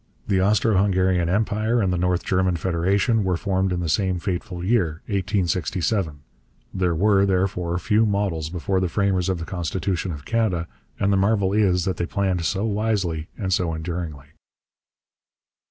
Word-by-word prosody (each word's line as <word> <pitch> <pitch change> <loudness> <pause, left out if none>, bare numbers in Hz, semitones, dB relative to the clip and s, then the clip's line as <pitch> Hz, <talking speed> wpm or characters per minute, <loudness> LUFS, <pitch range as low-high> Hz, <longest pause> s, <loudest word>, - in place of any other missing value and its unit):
The 95 -2 +2
Austro 105 +1 +3
Hungarian 95 -3 +2
Empire 110 +4 +1
and 95 -4 +1
the - - 0
North 90 0 +1
German 95 -1 +1
Federation 95 +6 +1
were 90 -2 0
formed 95 0 0
in 90 -1 -1
the 85 - -2
same 95 +3 +1
fateful 90 -1 -4
year, 90 -7 0
1867. 95 -4 -1 0.5
There 90 -3 0
were, 100 +3 +3
therefore, 90 -2 0
few 105 +5 +2
models 100 -7 -1
before 90 +2 -1
the 90 -1 0
framers 95 -1 +1
of 95 - 0
the 85 - -5
constitution 90 +1 -2
of 75 -3 -8
Canada, 105 -8 0 0.3
and 100 +1 +2
the - - +3
marvel 100 -1 +2
is 95 -4 +2
that 95 -2 -1
they 85 - -2
planned 95 -4 -1
so 95 +6 0
wisely 100 -7 -1
and 95 -3 -1
so 85 -3 0
enduringly. 80 -4 -5
95 Hz, 160 wpm, -23 LUFS, 85-100 Hz, 0.5 s, Austro